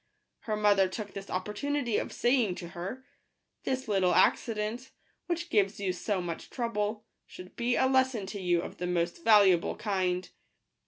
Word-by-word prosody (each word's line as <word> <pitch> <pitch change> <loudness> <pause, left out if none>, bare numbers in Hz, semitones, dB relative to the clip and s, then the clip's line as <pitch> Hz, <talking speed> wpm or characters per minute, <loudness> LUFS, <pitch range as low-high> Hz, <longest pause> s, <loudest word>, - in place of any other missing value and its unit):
Her 215 - -3
mother 205 -2 +4
took 205 +2 -6
this 195 0 -8
opportunity 235 +6 -1
of - - -5
saying 240 -6 +2
to 175 -1 -7
her, 195 +11 -6 0.3
" - - -52
This 260 -1 -2
little 190 -4 +2
accident, 225 +3 +1 0.4
which 345 -1 -3
gives 200 -1 +2
you 190 -2 -1
so 195 +2 -2
much 170 -1 -6
trouble, 215 -3 -2 0.2
should 180 0 -12
be 245 +1 0
a - - +3
lesson 260 -5 +2
to 200 +1 -6
you 175 -1 +1
of - - -8
the 180 - -3
most 170 -1 -1
valuable 200 -6 +5
kind. 185 -3 -1
205 Hz, 165 wpm, -29 LUFS, 185-240 Hz, 0.4 s, valuable